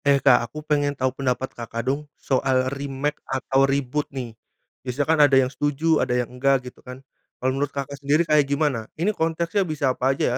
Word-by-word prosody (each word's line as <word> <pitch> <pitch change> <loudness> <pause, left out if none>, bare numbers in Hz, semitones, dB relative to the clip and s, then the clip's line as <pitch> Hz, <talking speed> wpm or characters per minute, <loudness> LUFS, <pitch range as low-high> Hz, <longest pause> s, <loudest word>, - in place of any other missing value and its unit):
Eh 140 -1 +5
Kak 125 -4 +4
aku 155 0 -9
pengen 145 -2 0
tau 130 -1 0
pendapat 130 -1 -2
Kakak 115 0 -5
dong 145 +3 -2
soal 130 -1 +1
remake 140 +1 -3
atau 135 +1 +1
reboot 140 +1 -1
nih. 125 -4 -6 0.5
Biasa 130 +3 -2
kan 160 0 +3
ada 140 -2 +6
yang 130 -1 +3
setuju, 145 +4 +1
ada 125 - 0
yang 125 - +1
enggak 130 0 +1
gitu 125 - -11
kan. 125 +1 -11 0.3
Kalau 130 +1 0
menurut 140 +1 -1
Kakak 140 0 -6
sendiri 150 +4 +2
kayak 150 -2 +4
gimana? 140 -6 0
Ini 190 +7 +1
konteksnya 165 +3 0
bisa 150 -7 0
apa 135 +1 0
aja - - -1
ya. 125 - 0
135 Hz, 205 wpm, -23 LUFS, 130-145 Hz, 0.5 s, ada